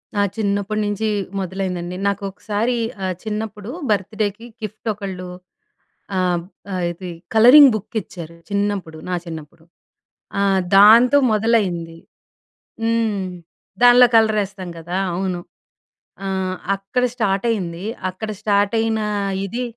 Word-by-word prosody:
నా 205 Hz, -, +2 dB, 0.2 s
చిన్నప్పడి 205 Hz, 0 st, -1 dB
నుంచి 205 Hz, +1 st, -1 dB, 0.3 s
మొదలైందండి. 180 Hz, -1 st, -3 dB
నాకొకసారి 205 Hz, +4 st, -2 dB, 0.3 s
ఆహ్, 185 Hz, -, -1 dB
చిన్నప్పుడు 215 Hz, 0 st, -5 dB, 0.2 s
బర్త్‌డేకి 210 Hz, +2 st, -1 dB, 0.2 s
గిఫ్ట్ 215 Hz, +2 st, -7 dB
ఒకళ్ళు 190 Hz, -3 st, -6 dB, 0.9 s
ఆం 180 Hz, -2 st, +1 dB, 0.3 s
ఆహ్, 180 Hz, -1 st, -2 dB
ఇది 175 Hz, +1 st, -8 dB, 0.2 s
కలరింగ్ 250 Hz, +5 st, +9 dB
బుక్ 215 Hz, +2 st, -7 dB
ఇచ్చారు. 170 Hz, -2 st, -10 dB
చిన్నప్పుడు, 200 Hz, -5 st, -2 dB
నా 180 Hz, -, 0 dB
చిన్నప్పుడు. 160 Hz, 0 st, -9 dB, 0.8 s
ఆహ్, 195 Hz, -1 st, +3 dB, 0.2 s
దాంతో 230 Hz, +7 st, +8 dB
మొదలైంది. 200 Hz, -7 st, 0 dB, 0.9 s
హ్మ్. 225 Hz, -4 st, 0 dB, 0.6 s
దానిలో 245 Hz, 0 st, +8 dB
కలరేస్తాం 205 Hz, -4 st, +2 dB
గదా! 175 Hz, +3 st, -4 dB, 0.2 s
అవును. 185 Hz, -1 st, -2 dB, 0.9 s
ఆహ్, 190 Hz, -1 st, -2 dB, 0.2 s
అక్కడ 195 Hz, +6 st, -2 dB
స్టార్ట్ 200 Hz, -2 st, 0 dB
అయింది, 180 Hz, -4 st, -3 dB, 0.2 s
అక్కడ 215 Hz, +4 st, -6 dB
స్టార్ట్ 205 Hz, 0 st, +2 dB
అయినా 220 Hz, -1 st, 0 dB, 0.4 s
ఇది, 235 Hz, +6 st, -3 dB
200 Hz, 105 wpm, -20 LUFS, 185-220 Hz, 0.9 s, కలరింగ్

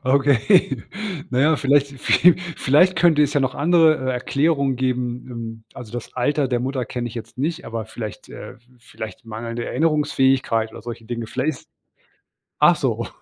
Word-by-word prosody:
Okay, 135 Hz, -, +3 dB, 0.5 s
na 125 Hz, -, 0 dB
ja, 155 Hz, +2 st, +4 dB
vielleicht 140 Hz, -1 st, +1 dB
viel 175 Hz, -1 st, +5 dB, 0.2 s
vielleicht 170 Hz, +7 st, +3 dB
könnte 165 Hz, -3 st, +4 dB
es 145 Hz, 0 st, +1 dB
ja 145 Hz, -, +3 dB
noch 130 Hz, -1 st, -1 dB
andere, 160 Hz, 0 st, +4 dB
äh, -, -, -1 dB
Erklärungen 140 Hz, +1 st, 0 dB
geben, 125 Hz, -1 st, -2 dB
ähm 115 Hz, -2 st, -7 dB
also, 120 Hz, -3 st, -10 dB
das 120 Hz, -2 st, -7 dB
Alter 135 Hz, +2 st, 0 dB
der 120 Hz, -2 st, 0 dB
Mutter 130 Hz, 0 st, -2 dB
kenne 120 Hz, +1 st, -4 dB
ich 110 Hz, -, -11 dB
jetzt 115 Hz, +1 st, -9 dB
nicht, 165 Hz, +5 st, -2 dB
aber 115 Hz, -1 st, -5 dB
vielleicht, 110 Hz, -2 st, -8 dB
äh -, -, -9 dB, 0.2 s
vielleicht 110 Hz, -2 st, -9 dB
mangelnde 115 Hz, +1 st, -5 dB
Erinnerungsfähigkeit 135 Hz, -7 st, +1 dB
oder 115 Hz, -, -10 dB
solche 115 Hz, -1 st, -8 dB
Dinge. 115 Hz, 0 st, -5 dB
Vielleicht 130 Hz, +6 st, -1 dB
ist -, -, -26 dB, 0.9 s
ach -, -, +6 dB
so, -, -, -2 dB
130 Hz, 170 wpm, -21 LUFS, 115-145 Hz, 0.9 s, ach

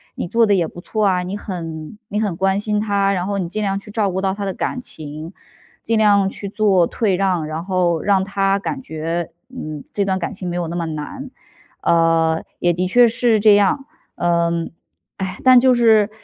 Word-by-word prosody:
你 -, -, -4 dB
做 230 Hz, +5 st, +3 dB
得 205 Hz, -, +3 dB
也 170 Hz, -3 st, +1 dB
不 175 Hz, -, -11 dB
错 215 Hz, +4 st, -1 dB
啊， 180 Hz, -2 st, +1 dB
你 185 Hz, +2 st, -4 dB
很 165 Hz, -3 st, -6 dB
你 210 Hz, +1 st, -1 dB
很 205 Hz, -6 st, -1 dB
关 195 Hz, 0 st, +1 dB
心 210 Hz, 0 st, 0 dB
他。 200 Hz, -2 st, +1 dB
然 180 Hz, -2 st, -1 dB
后 200 Hz, 0 st, -1 dB
你 175 Hz, -3 st, -3 dB
尽 215 Hz, -, -3 dB
量 195 Hz, -1 st, 0 dB
去 205 Hz, -, -15 dB
照 205 Hz, -2 st, 0 dB
顾 190 Hz, +1 st, -2 dB
到 190 Hz, -1 st, 0 dB
他 200 Hz, 0 st, -4 dB
的 195 Hz, -, -2 dB
感 250 Hz, -, -3 dB
情， 155 Hz, -2 st, -7 dB, 0.5 s
尽 225 Hz, 0 st, +1 dB
量 205 Hz, -2 st, +4 dB
去 200 Hz, -, -7 dB
做 200 Hz, -5 st, +3 dB
退 205 Hz, -5 st, 0 dB
让。 180 Hz, -4 st, 0 dB
然 155 Hz, +2 st, -4 dB
后 180 Hz, -3 st, 0 dB
让 195 Hz, -2 st, +2 dB
他 195 Hz, 0 st, 0 dB
感 265 Hz, +7 st, -4 dB
觉， 165 Hz, -2 st, -4 dB, 0.2 s
嗯， 155 Hz, -, -7 dB
这 205 Hz, -, +1 dB
段 190 Hz, -1 st, 0 dB
感 170 Hz, -, -3 dB
情 185 Hz, -2 st, -5 dB
没 175 Hz, -, -4 dB
有 175 Hz, -1 st, -2 dB
那 170 Hz, -, -5 dB
么 170 Hz, -1 st, -2 dB
难。 160 Hz, -, -6 dB, 0.5 s
“呃， 165 Hz, -1 st, +2 dB, 0.2 s
也 175 Hz, 0 st, +2 dB
的 180 Hz, +2 st, -1 dB
确 245 Hz, +5 st, +5 dB
是 230 Hz, -1 st, +2 dB
这 210 Hz, -1 st, +6 dB
样。 205 Hz, +7 st, +2 dB, 0.3 s
嗯， 170 Hz, -1 st, 0 dB, 0.5 s
唉， 190 Hz, -1 st, -4 dB
但 255 Hz, -1 st, +8 dB
就 255 Hz, +1 st, +4 dB
是， 220 Hz, -3 st, +4 dB
190 Hz, 225 characters per minute, -20 LUFS, 170-210 Hz, 0.5 s, 但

